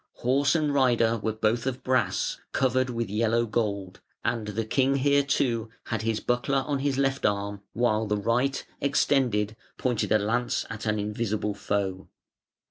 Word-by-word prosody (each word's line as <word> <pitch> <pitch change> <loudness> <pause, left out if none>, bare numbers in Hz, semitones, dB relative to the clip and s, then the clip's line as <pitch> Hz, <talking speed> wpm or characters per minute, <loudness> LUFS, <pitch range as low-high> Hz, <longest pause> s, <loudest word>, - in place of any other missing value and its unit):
Horse 135 +4 +2
and 150 -3 +1
rider 120 -4 +3
were 110 - -1
both 110 +3 0
of 130 -1 -3
brass, 125 -8 0
"covered 130 0 +2
with 115 -2 -2
yellow 115 +3 +1
gold", 100 -4 -2 0.2
and 115 -2 -1
the 105 +2 -2
king 135 +4 +2
here 140 +1 +3
too 120 -5 0 0.2
had 115 -3 -1
his 110 -1 0
buckler 130 +4 0
on 145 -2 -1
his 140 -1 0
left 135 0 0
arm, 100 0 -1
while 110 -1 +1
the 105 0 0
right, 120 +6 0 0.2
extended, 125 -7 +2 0.2
pointed 125 -4 -1
a 110 - +6
lance 115 +4 0
at 110 0 -5
an 105 0 +1
invisible 105 0 -2
foe. 95 -2 -2
115 Hz, 160 wpm, -27 LUFS, 105-130 Hz, 0.2 s, a